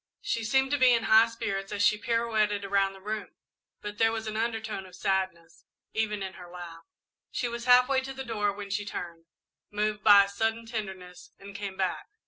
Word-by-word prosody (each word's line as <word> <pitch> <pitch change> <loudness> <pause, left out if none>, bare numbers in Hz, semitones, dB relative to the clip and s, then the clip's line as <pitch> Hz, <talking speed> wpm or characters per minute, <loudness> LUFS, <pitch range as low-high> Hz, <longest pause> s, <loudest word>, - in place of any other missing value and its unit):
She 230 - -1
seemed 265 +5 +2
to 290 - +1
be 255 -1 +6
in 230 - -1
high 220 +1 +6
spirits 200 -4 -4
as 205 -1 0
she 210 - +5
pirouetted 215 -2 0
around 195 0 +1
the 195 - -13
room, 210 +2 -5 0.5
but 210 0 -7
there 225 0 +4
was 225 0 -4
an 215 0 -4
undertone 220 -3 -3
of 180 - -14
sadness, 185 -4 -2 0.3
even 210 -2 -1
in 190 0 -5
her 175 - -11
laugh. 170 -2 -10 0.4
She 245 - -2
was 235 0 -5
half 250 0 +7
way 270 -1 +2
to 270 0 -6
the 265 0 -6
door 210 -3 0
when 200 0 -8
she 205 +1 -1
turned, 170 -4 -7 0.4
moved 210 0 -2
by 205 -2 +8
a - - -4
sudden 225 +3 -2
tenderness, 195 -1 -7
and 200 0 -11
came 200 -2 -5
back. 185 -2 -2
210 Hz, 205 wpm, -28 LUFS, 195-230 Hz, 0.5 s, by